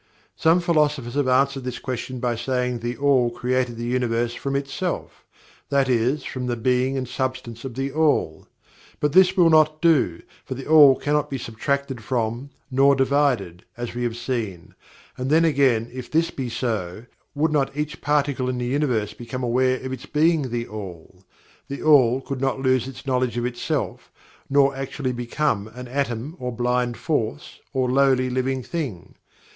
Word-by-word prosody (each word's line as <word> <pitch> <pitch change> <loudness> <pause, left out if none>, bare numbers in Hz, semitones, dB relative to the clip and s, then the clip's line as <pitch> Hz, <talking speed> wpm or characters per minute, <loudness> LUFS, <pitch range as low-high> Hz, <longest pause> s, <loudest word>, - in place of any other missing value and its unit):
Some 165 +2 +3
philosophers 150 -7 +1
have 145 -1 0
answered 135 +1 +2
this 125 -1 -4
question 130 0 -5
by 120 -1 0
saying 125 0 -1
that - - -17
THE 120 +1 -3
ALL 135 -4 +3
created 125 0 -1
the 120 - -5
Universe 120 -1 0
from 140 +2 -3
ITSELF 140 +6 -3 0.5
that 140 -2 +2
is, 125 +4 +1
from 125 -1 -4
the 120 - 0
being 125 +3 +1
and 130 -1 -3
substance 125 -3 -4
of 125 -3 -6
THE 135 +1 -2
ALL. 150 - +1 0.5
But 150 -1 0
this 190 +1 +5
will 170 -2 +6
not 155 -1 +4
do, 145 - +2 0.2
for 130 - -6
THE 135 - -7
ALL 150 -4 +8
cannot 145 +2 0
be 135 - -3
subtracted 130 +2 -3
from, 120 +2 -2 0.2
nor 135 +2 +5
divided, 135 -10 +1
as 120 -1 -5
we 120 - -4
have 120 -1 -2
seen, 115 -8 -4 0.4
and 130 +1 -3
then 160 +3 +4
again 135 -7 +3
if 130 -1 -7
this 165 +2 +1
be 130 -3 -4
so, 110 -4 -3 0.3
would 150 +2 +1
not 140 -2 0
each 150 +1 -3
particle 140 -3 +1
in 125 - -2
the 125 - -2
Universe 120 -6 0
be 115 +2 -11
aware 130 0 +1
of 130 - -3
its 130 +3 -8
being 155 -2 +2
THE 120 0 -3
ALL 95 -4 -9 0.5
THE 140 - -6
ALL 135 -4 +5
could 135 -1 -5
not 135 -1 0
lose 130 -2 +1
its 135 +1 -10
knowledge 125 -2 0
of 120 - -1
itself, 125 -1 -3 0.4
nor 140 0 +4
actually 135 0 -3
BECOME 120 -3 -1
an 125 0 -8
atom, 135 +3 -3
or 125 0 -3
blind 125 0 0
force, 110 - -3
or 130 -1 0
lowly 130 -1 +3
living 130 +1 -1
thing. 135 - -5
130 Hz, 175 wpm, -23 LUFS, 120-140 Hz, 0.5 s, ALL